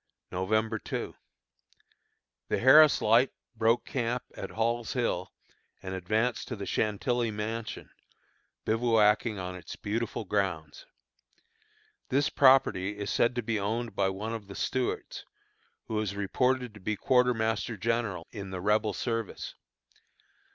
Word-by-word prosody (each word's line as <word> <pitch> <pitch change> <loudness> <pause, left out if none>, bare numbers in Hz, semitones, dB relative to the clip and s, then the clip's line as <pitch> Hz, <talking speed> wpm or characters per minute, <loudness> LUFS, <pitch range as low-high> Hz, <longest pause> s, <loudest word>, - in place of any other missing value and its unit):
November 110 +4 0
2. - - -4 1.3
The - - 0
Harris 150 +4 +7
Light 115 +5 +5 0.2
broke 115 +2 +2
camp 125 -1 -2
at - - -6
Hall's 115 +1 -1
Hill 115 -7 -1 0.5
and 95 0 -5
advanced 110 +7 -1
to 125 - -4
the 100 -2 -6
Chantilly 115 +4 0
Mansion, 110 +2 -5 0.7
bivouacking 110 -1 +3
on 90 -1 -4
its 90 - -8
beautiful 115 +1 -3
grounds. 90 -7 -2 1.2
This 140 +3 +2
property 105 -8 +4
is 100 -1 -3
said 120 +1 +2
to 120 - -1
be 110 -1 -1
owned 110 +2 -2
by 95 - +2
one 105 +4 -4
of 110 -3 -6
the 100 - -9
Stuarts, 130 -1 -2 0.6
who 110 - -2
is 100 -2 -2
reported 125 +4 0
to 105 - -12
be 105 +3 -2
a - - -5
quartermaster 115 -3 +1
general 110 -5 -1
in 100 -2 -7
the 95 -1 -5
Rebel 105 +2 +1
service. 115 0 -3
110 Hz, 130 wpm, -29 LUFS, 100-120 Hz, 1.3 s, Harris